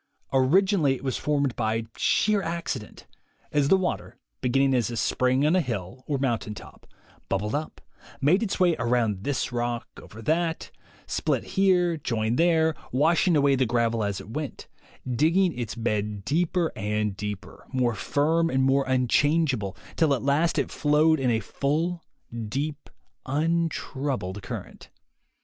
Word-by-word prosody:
Originally 155 +2 +3
it 130 - -10
was 130 -2 -1
formed 140 -4 0
by 115 0 -1
sheer 210 -1 +2
accident, 165 - -5 0.5
as 145 -2 +2
the 190 - +5
water, 185 -1 -3 0.2
beginning 135 +2 +2
as 120 -3 +1
a 120 - -4
spring 130 +4 +2
on 155 +4 +3
a 185 - +4
hill 120 - -5
or 145 - 0
mountain 120 -5 -1
top, 95 - -13 0.4
bubbled 105 +2 -1
up, 155 +2 -3 0.4
made 155 +9 +3
its 205 -4 -2
way 175 -3 +4
around 115 -5 0
this 140 -1 -1
rock 120 -1 -2
and - - -11
over 110 - -13
that, 165 +5 -1 0.3
split - - -1
here, 180 -3 +3
joined 115 -3 -1
there, 160 -2 +3 0.2
washing 165 +6 +3
away 140 -1 +4
the 130 -2 +1
gravel 115 -1 +1
as 100 -1 -2
it 110 - -10
went, 150 +1 -5 0.4
digging 165 +8 +2
^s 120 -3 -5
bed 105 -2 -1
deeper 170 +4 +1
and 105 -1 -1
deeper, 105 0 -7
more 125 -3 +1
firm 160 +9 +1
and 130 -3 +1
more 135 +1 +3
unchangeable, 130 - +1 0.2
till 155 -4 +3
at 125 - -5
last 145 +5 +2
it - - 0
flowed 155 +2 +3
in 130 -2 +1
a 115 -2 +2
full, 160 - -1 0.5
deep, 145 +5 -4 0.4
untroubled 145 - -1
current. 95 - -8
135 Hz, 150 wpm, -26 LUFS, 115-160 Hz, 0.5 s, the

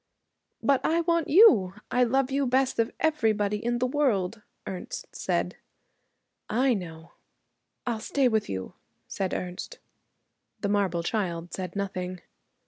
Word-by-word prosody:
'But 275 -2 +3
I 335 +2 +2
want 335 -2 +1
you. 285 - +6 0.2
I 250 - +4
love 265 +2 +1
you 275 0 +1
best 260 +1 +1
of 230 +1 +3
everybody 220 -9 +1
in 240 +1 0
the 250 - +1
world,' 230 -7 0 0.2
Ernest 185 -2 -6
said. - - -1 0.9
'I 255 +4 +3
know.' 165 -4 -6 0.7
'I'll 235 -3 -1
stay 265 +4 +1
with 220 -3 0
you,' 95 -1 -4 0.3
said 190 -2 -2
Ernest. 180 - -5 0.8
The 200 - 0
marble 190 -4 +1
child 175 -4 -2
said 185 -1 -5
nothing. 185 -2 -3
220 Hz, 135 wpm, -27 LUFS, 185-265 Hz, 0.9 s, you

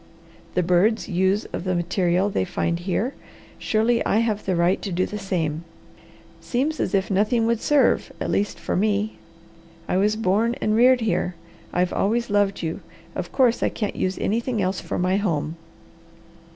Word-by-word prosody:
The 180 - +2
birds 180 +6 +2
use 190 +2 +1
of - - -3
the 185 -1 -1
material 175 +2 +1
they - - 0
find 170 -2 -1
here; 195 +9 -1 0.5
surely 230 +2 +1
I - - +1
have 220 -2 0
the 185 - 0
right 170 +2 +2
to 200 - -4
do 180 +1 +1
the 210 - -6
same. 165 -5 -2 0.8
Seems 285 +6 -1
as - - 0
if 195 +1 0
nothing 210 +5 +2
else - - +1
would 235 -1 0
serve, 295 -2 +2
at - - -2
least 205 +1 -1
for - - -2
me. 210 +2 0 0.7
I - - +1
was 210 +2 +2
born 225 +3 +1
and 215 - +1
reared 250 +2 +5
here, 195 -5 0 0.4
I've 180 0 0
always 230 +3 0
loved 200 -2 +1
you; 160 0 -3 0.4
of - - -4
course, 250 -3 +3
I - - +2
can't 210 - -3
use 185 0 -1
anything 230 +2 -1
else 185 -1 -1
for - - -4
my 185 +2 +1
home." 165 -6 -1
200 Hz, 180 wpm, -23 LUFS, 180-225 Hz, 0.8 s, reared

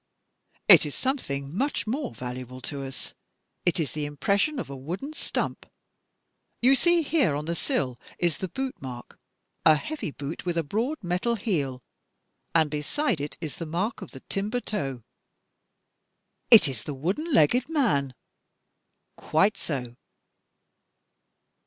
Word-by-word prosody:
'' - - -52 0.2
It - - +10
is - - -5
something 145 - -2
much 275 +7 0
more 255 +5 -2
valuable 125 0 -6
to 140 0 -5
us. 135 -1 -6 0.5
It 175 - +3
is 155 - -1
the 150 -1 -3
impression 200 - +1
of 250 - -3
a 140 - -7
wooden 175 - -5
stump. - - -3 0.9
You 255 +3 +6
see 340 +5 +4
here 285 - +2
on 150 +1 -3
the 170 - -1
sill 130 -6 -1 0.2
is 170 -4 0
the 190 - -2
boot 265 +8 -4
mark, 125 -2 -8 0.4
a 160 -1 +7
heavy 295 - -4
boot 145 +2 -6
with 175 -1 -1
a 165 - +2
broad 230 - -2
metal 180 +7 0
heel, 145 - -2 0.7
and 160 -3 +4
beside 165 - 0
it 145 - -5
is 155 -4 -5
the 165 - -5
mark 185 +9 -2
of - - -7
the 130 - -11
timber 210 +5 -2
toe." 135 - -4 1.5
"It - - +9
is 130 -6 -4
the 145 - -5
wooden 195 - -2
legged 245 - +4
man." 145 - +1 1.0
"Quite 190 +7 +2
so." 125 -5 -4
170 Hz, 145 wpm, -27 LUFS, -, 1.5 s, It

